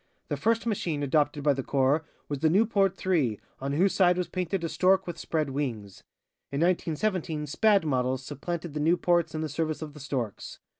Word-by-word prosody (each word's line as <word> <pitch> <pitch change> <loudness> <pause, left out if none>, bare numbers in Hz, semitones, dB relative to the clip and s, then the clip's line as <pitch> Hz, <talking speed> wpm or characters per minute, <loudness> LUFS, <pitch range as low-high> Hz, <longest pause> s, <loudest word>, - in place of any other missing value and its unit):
The - - 0
first 230 +1 +1
machine 170 -9 -1
adopted 145 +1 +1
by 145 -1 +4
the 135 - -3
corps 140 +4 +2 0.2
was 145 -2 -3
the 160 - +3
Nieuport 195 0 +3
3, 155 - 0 0.2
on 140 +1 -3
whose 185 +6 +3
side 180 -2 +4
was 180 - -1
painted 185 0 -2
a - - 0
stork 185 +3 +3
with 175 - -6
spread 155 -4 -1
wings. 115 -9 -4 0.5
In 140 - -2
1917, 170 -2 0
Spad 200 +5 +3
models 130 -2 0
supplanted 170 +3 -5
the 150 - -3
Nieuports 170 +1 +2
in 155 - -2
the 160 - -1
service 155 +1 -2
of 150 -2 -8
The 150 - -11
Storks. 130 -7 -4
155 Hz, 190 wpm, -28 LUFS, 140-180 Hz, 0.5 s, by